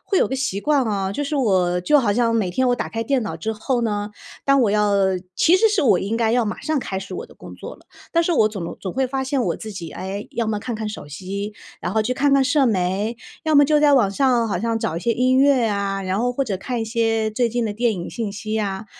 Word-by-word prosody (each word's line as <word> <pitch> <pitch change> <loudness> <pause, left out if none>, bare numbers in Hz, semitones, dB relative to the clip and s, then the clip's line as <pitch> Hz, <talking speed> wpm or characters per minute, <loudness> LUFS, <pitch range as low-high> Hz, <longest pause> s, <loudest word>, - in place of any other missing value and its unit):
会 390 - +1
有 - - +3
个 265 - -2
习 255 -7 -2
惯 290 +1 +2
啊， 200 -4 -1
就 290 +7 -2
是 285 - -3
我 185 -9 +2
就 295 +12 +4
好 230 -7 +2
像 230 +1 +2
每 220 -5 +1
天 255 +8 +1
我 245 - +2
打 - - -3
开 225 - -3
电 250 +1 0
脑 160 - -4
之 220 +7 -3
后 240 +4 -1
呢， 210 -2 -2 0.3
当 275 -1 +4
我 220 - +2
要 210 0 +2 0.4
其 335 - +4
实 445 +4 +4
是 415 -3 +1
我 225 -9 +4
应 205 +5 -2
该 230 -1 +1
要 240 0 +2
马 215 - -4
上 310 -2 -1
开 195 -6 -4
始 195 - -9
我 475 - -6
的 - - -18
工 - - -12
作 - - -8
了， - - -21 0.3
但 335 - +3
是 340 - -1
我 220 -10 +4
总 210 -4 -6
能 170 - -6
总 185 - -5
会 265 - +1
发 265 +1 -2
现 265 -1 0
我 - - -1
自 220 - -8
己， 170 -5 -7
哎， 195 +5 -6
要 235 - -2
么 210 -1 -1
看 245 - -4
看 215 0 -4
手 210 -8 -8
机， 195 +7 -5 0.3
然 - - -3
后 220 - +2
去 235 +4 -1
看 280 +2 +2
看 275 -1 +4
社 275 +2 +3
媒， 205 +1 0 0.3
要 315 -2 +2
么 285 - +7
就 300 +1 +3
在 295 -1 +5
网 240 -7 +4
上， 240 +3 +2
好 195 - -1
像 230 0 0
找 165 - -2
一 - - -3
些 235 - 0
音 255 +2 +2
乐 275 -1 +4
呀， 200 -2 -1
然 185 0 -1
后 245 +1 0
或 275 +2 -1
者 205 -6 -2
看 240 +5 -4
一 - - -1
些 225 -1 0
最 240 +2 +1
近 235 +1 -1
的 215 - -2
电 230 +2 +1
影 175 -2 -5
信 225 -3 -4
息 215 +1 -6
呀， 210 -1 -2
225 Hz, 305 characters per minute, -21 LUFS, 200-265 Hz, 0.4 s, 么